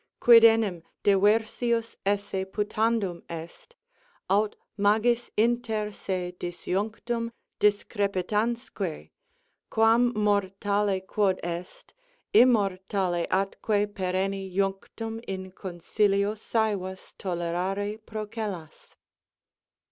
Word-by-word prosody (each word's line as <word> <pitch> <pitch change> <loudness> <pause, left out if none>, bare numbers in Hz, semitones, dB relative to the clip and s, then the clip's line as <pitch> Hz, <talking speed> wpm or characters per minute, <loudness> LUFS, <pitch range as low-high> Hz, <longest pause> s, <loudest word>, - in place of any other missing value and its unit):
Quid 235 -1 +8
enim 225 -6 +4 0.2
diversius 225 +3 +2
esse 200 -1 0
putandum 210 -3 0
est, 170 - -9 0.6
Aut 205 +2 +2 0.2
magis 220 +4 +2
inter 225 -2 +1
se 185 -3 -3
disjunctum 220 +6 -3 0.3
discrepitansque, 205 -1 -1 0.6
Quam, 230 +2 +4
mortale 200 -1 +1
quod 195 -2 +1
est, 175 +1 -6 0.4
immortali 195 -6 +3
atque 205 +2 0
perenni 190 0 -2
Junctum, 200 +4 -2
in 190 -1 -5
concilio, 200 +3 0
sævas 205 -4 -2
tolerare 185 +4 -2
procellas? 215 -6 -6
205 Hz, 75 wpm, -27 LUFS, 190-220 Hz, 0.6 s, Quid